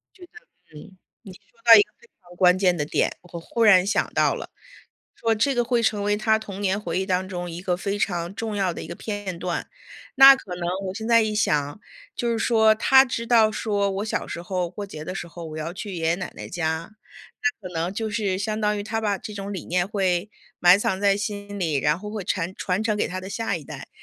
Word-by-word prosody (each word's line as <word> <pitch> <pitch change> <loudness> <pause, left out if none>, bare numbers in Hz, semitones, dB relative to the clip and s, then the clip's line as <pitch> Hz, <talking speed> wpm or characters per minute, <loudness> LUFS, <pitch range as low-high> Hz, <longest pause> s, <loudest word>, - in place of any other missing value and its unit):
觉 370 - -15
得 - - -29 0.4
嗯， 190 +5 -13 0.3
你 195 -5 -11
说 200 +2 -17 0.2
到 230 -1 +10
一 205 - +9
个 210 - -10
非 235 - -20 0.2
常 175 0 -16
关 180 0 +4
键 180 -2 +3
的 150 - -1
点， - - 0
我 175 -1 -9
忽 230 +7 -3
然 190 -4 +6
想 200 - 0
到 - - +3
了 - - -8 0.7
说 225 -1 +1
这 260 +5 +1
个 240 - +2
会 240 -1 +1
成 210 -2 +1
为 205 0 +1
他 220 +1 +2
童 200 -2 -8
年 195 0 0
回 175 -3 -3
忆 190 - -2
当 185 0 -1
中 175 -2 -5
一 170 +1 -7
个 180 -2 0
非 200 +2 -3
常 175 -1 -2
重 220 0 -4
要 190 -3 0
的 - - -7
一 - - -7
个 170 - -6
片 205 -5 -5
段。 175 -1 -3 0.5
那 270 +1 +10
可 185 -8 -8
能 175 -1 -3 0.2
我 185 - -5
现 220 +2 -5
在 230 -1 +6
一 215 -1 -1
想， 145 -6 0 0.4
就 240 - -1
是 225 - -1
说， 220 -2 +4
他 265 +4 +6
知 235 -2 -4
道 225 -2 +4
说： 205 -2 0
“我 - - -3
小 220 - -2
时 170 - -6
候 180 -1 -2
过 200 +2 -7
节 155 -6 -8
的 185 - -5
时 180 -3 -6
候， 170 0 -9
我 155 0 -7
要 160 +2 -4
去 195 +1 -7
爷 165 -2 -4
爷 165 - +3
奶 180 -1 -6
奶 - - -8
家“， 160 +1 -3 0.5
那 225 -10 -2
可 180 - -13
能 165 +3 -2
就 220 0 -3
是 205 -3 -1
相 215 +2 -2
当 210 0 +1
于 205 - -3
他 225 +1 -3
把 205 -3 -1
这 220 -4 -8
种 200 0 -5
理 185 - -6
念 175 +1 0
会 190 -1 -1 0.3
埋 180 +2 +6
藏 190 -2 -1
在 200 -1 +3
心 205 0 -5
里， 160 -6 0
然 150 +5 +1
后 210 +1 -7
会 210 -4 -5
传- 185 0 -2
传 190 +2 -1
承 215 -2 0
给 - - 0
他 185 +1 -5
的 190 - -8
下 225 -2 -2
一 155 - -8
代， - - -9
200 Hz, 270 characters per minute, -24 LUFS, 180-215 Hz, 0.7 s, 到